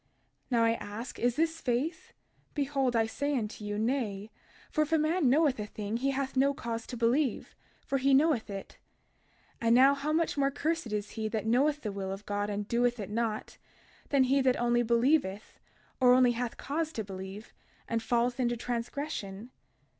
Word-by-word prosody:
32:18 - - -42 0.4
Now 235 -3 +3
I 230 - +4
ask, 225 +2 -7
is 245 0 +1
this 325 +1 0
faith? 270 +7 -2 0.4
Behold, 275 -3 0
I 225 -1 +3
say 285 +5 -1
unto 215 -2 -4
you, 205 0 -3
Nay; 220 -3 -1 0.4
for 310 - +1
if 305 +1 0
a 325 - +5
man 310 -1 +2
knoweth 285 -2 +3
a 210 - -3
thing 210 +1 -4
he 270 +3 0
hath 270 0 -2
no 275 +2 +3
cause 230 -2 -4
to 245 - -6
believe, 245 +3 +1 0.3
for 275 - 0
he 275 +2 +2
knoweth 280 -6 +2
it. 195 -1 -8 0.8
32:19 230 - 0
And 230 - +6
now, 265 +3 +7
how 280 +2 -2
much 320 -2 +1
more 275 0 +3
cursed 305 -2 -2
is 210 -1 -3
he 220 -1 -3
that 215 -1 -3
knoweth 280 +6 +2
the 210 - -3
will 195 -1 -4
of 195 +1 -7
God 205 0 -2
and 205 0 -3
doeth 240 +1 +1
it 205 -1 -5
not, 220 -1 -2 0.5
than 280 -2 +4
he 270 +2 +3
that 260 -1 +2
only 240 0 +2
believeth, 235 -3 +1 0.4
or 250 -1 +6
only 255 -1 +5
hath 240 0 -3
cause 315 +3 -2
to 220 - -3
believe, 190 +2 -8 0.3
and 230 -1 -1
falleth 240 +2 0
into 240 -1 +1
transgression? 235 -3 -4
240 Hz, 190 wpm, -30 LUFS, 220-275 Hz, 0.8 s, now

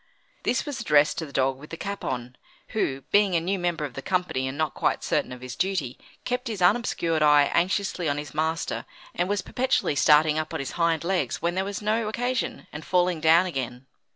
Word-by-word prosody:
This 250 - 0
was 285 -5 -4
addressed 150 -7 +3
to 160 - -4
the - - -12
dog 135 0 0
with 150 - -12
the 165 - -7
cap 200 +2 -5
on, 125 0 -4 0.3
who, 135 -11 -1
being 205 -3 +4
a - - +4
new 185 +4 -1
member 170 -3 -1
of 135 - -7
the 135 - -6
company, 180 -7 -1
and 130 +2 -5
not 155 -2 0
quite - - 0
certain - - 0
of 125 0 -8
his 125 -1 -7
duty, 180 -9 -2 0.3
kept 250 +1 -2
his 220 -4 -4
unobscured 175 -5 +2
eye 150 -1 +5
anxiously 180 -2 0
on 145 - -1
his 145 -3 -6
master, 160 +2 -1 0.3
and 175 +2 -1
was 205 -1 0
perpetually 255 - 0
starting 150 +1 +5
up 155 0 -4
on - - -2
his 140 - -4
hind 170 -2 +1
legs 185 +1 -1
when 170 +1 0
there 190 +1 0
was 200 +1 -5
no 215 +1 +1
occasion, 245 +1 -2
and 150 +1 -7
falling 180 -1 +1
down 165 +3 +5
again. 130 -6 -4
165 Hz, 215 wpm, -26 LUFS, 145-195 Hz, 0.3 s, eye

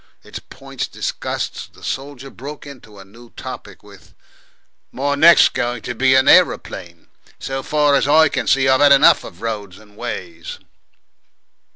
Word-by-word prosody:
Its - - -9
points - - -8
discussed, - - -5
the - - -19
soldier 135 0 -6
broke 145 +4 -10
into 120 -7 -14
a 95 - -13
new 115 +4 -17
topic - - -10
with, - - -18 0.8
"My 140 +2 -2
next's 165 +4 +6
going 120 -2 -4
to 125 - -5
be 130 +2 +2
an 130 +1 +3
aeroplane, 90 - +1 0.3
so 135 0 -5
far 150 +1 +1
as 140 - +2
I 160 +2 +5
can - - -4
see. 130 -1 +2
I've 130 +1 +3
had 145 -1 +5
enough 140 +2 +5
of 90 - -13
roads 105 -5 -5
and 105 -1 -20
ways." 85 -8 -7
130 Hz, 160 wpm, -18 LUFS, 110-145 Hz, 0.8 s, next's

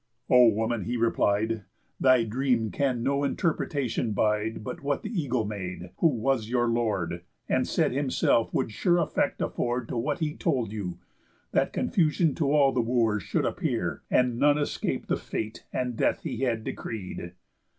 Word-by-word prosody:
"O 125 -1 +8
woman," 110 0 0
he 120 +1 -1
replied, 110 -1 +1 0.4
"Thy 130 -3 +5
dream 115 -1 0
can 130 -4 0
no 140 +2 +1
interpretation 140 -6 -1
bide 105 +1 0
But - - -6
what 140 0 -1
the 215 - -5
eagle 135 - 0
made, 90 -4 -6
who 170 - +4
was 125 -4 0
your 120 -1 +2
lord, 105 -7 -1 0.3
And - - +1
said - - +1
himself 130 -4 +1
would - - -1
sure 175 - +2
effect 165 -3 0
afford 120 -1 -2
To - - -3
what 140 +5 -1
he 155 -2 -2
told 120 -6 0
you; 95 -5 -4 0.5
that - - +2
confusion 160 -3 +2
To 145 -4 0
all 145 -2 +5
the 125 - +1
Wooers 115 -3 +1
should - - -1
appear, - - -2
and 125 -2 +2
none 145 0 +4
Escape 145 - -2
the - - 0
fate 110 0 -5
and 125 -2 -2
death - - +1
he - - -3
had 115 -3 0
decreed." 90 -7 -6
120 Hz, 165 wpm, -27 LUFS, 110-140 Hz, 0.5 s, O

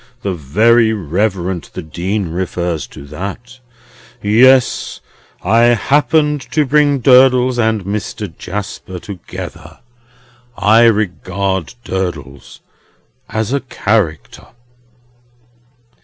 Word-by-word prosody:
The 100 - -1
Very 110 - +3
Reverend 95 -2 -2
the 90 - -5
Dean 90 +4 -3
refers 85 -1 -3
to 70 - -12
that? 100 - -7 0.6
Yes. 125 +5 +3 0.4
I 115 +5 +4
happened 150 +3 +2
to 155 -2 +2
bring 145 -1 +2
Durdles 125 -1 +5
and 110 -4 0
Mr. 100 -3 -5
Jasper 95 0 -6
together. 90 0 -9 0.8
I 110 +3 +5
regard 95 -3 -1
Durdles 80 - -5 0.7
as 110 +3 -2
a 140 - +1
Character." 100 - -2
105 Hz, 90 wpm, -16 LUFS, 90-120 Hz, 0.8 s, Durdles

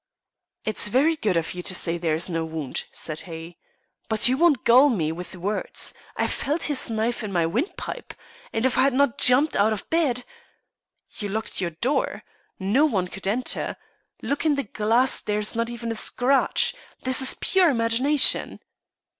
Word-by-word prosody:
"It's 215 -1 0
very 280 +9 +2
good 205 - 0
of 165 - -2
you 180 - -5
to 185 - -3
say 170 -1 0
there 165 -2 0
is 165 - -2
no 165 -2 -2
wound," 160 -4 -4
said 155 -1 -3
he. 165 +1 -9 0.5
"But 220 0 +3
you 255 - +2
won't 300 -4 +3
gull 255 +5 +6
me 165 - 0
with 180 +3 -8
words. 200 +4 -2 0.2
I - - +1
felt 300 +4 -1
his 290 -5 +1
knife 225 +2 -1
in 210 - -5
my 170 -3 +1
windpipe, 240 - -4 0.4
and 225 +2 -1
if 260 - +1
I - - +6
had 270 -1 +2
not 280 -3 +2
jumped 260 +5 +4
out 215 +2 +3
of 210 - -7
bed 285 -7 +1 0.4
" - - -49
"You 205 -2 -3
locked 220 -1 -3
your 175 - -1
door. 250 - -2 0.3
No 205 +10 +2
one 190 -9 -1
could 195 +1 -6
enter. 240 +6 -1 0.5
Look 280 - -2
in 310 -2 +2
the 280 - -1
glass, 230 +5 +1
there 210 0 -2
is 210 +1 -2
not 230 0 -1
even 235 -1 -5
a - - -1
scratch. 250 +4 +2 0.3
This 260 +1 +3
is 265 - +4
pure 375 -3 +3
imagination." 255 +3 +3
230 Hz, 185 wpm, -24 LUFS, 185-265 Hz, 0.5 s, gull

